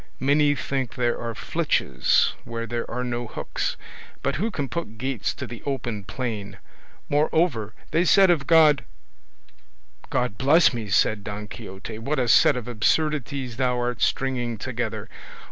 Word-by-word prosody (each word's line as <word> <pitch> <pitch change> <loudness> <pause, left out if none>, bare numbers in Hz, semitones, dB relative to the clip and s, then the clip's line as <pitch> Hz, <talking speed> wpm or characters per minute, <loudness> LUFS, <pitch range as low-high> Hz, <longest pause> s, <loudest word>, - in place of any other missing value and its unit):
many 145 +2 +3
think 135 -2 -3
there 120 -2 0
are 115 -1 -4
flitches 65 -10 +1
where 115 0 -5
there 115 +1 -4
are 125 +1 -3
no 120 -1 -3
hooks; - - -3 0.5
but 140 - 0
who 210 +8 0
can 145 -10 -3
put 130 -8 -5
gates 130 -2 -2
to - - -6
the 120 - -9
open 120 -7 -3
plain? 100 -2 -5 0.5
moreover 145 - +1 0.2
they 165 +2 +3
said 190 +1 +6
of 145 -6 0
God—" 155 -6 +6 1.3
"God 125 -5 -1
bless 150 +5 +5
me," 115 -4 -5
said 100 +2 +2
Don 105 0 -6
Quixote, 110 0 -8
"what 140 +7 -2
a 125 -2 +1
set 125 +3 +5
of 125 - -5
absurdities 135 +1 0
thou 125 -2 +1
art 120 -4 -2
stringing 125 -3 0
together! 110 -2 -4
125 Hz, 150 wpm, -24 LUFS, 110-140 Hz, 1.3 s, said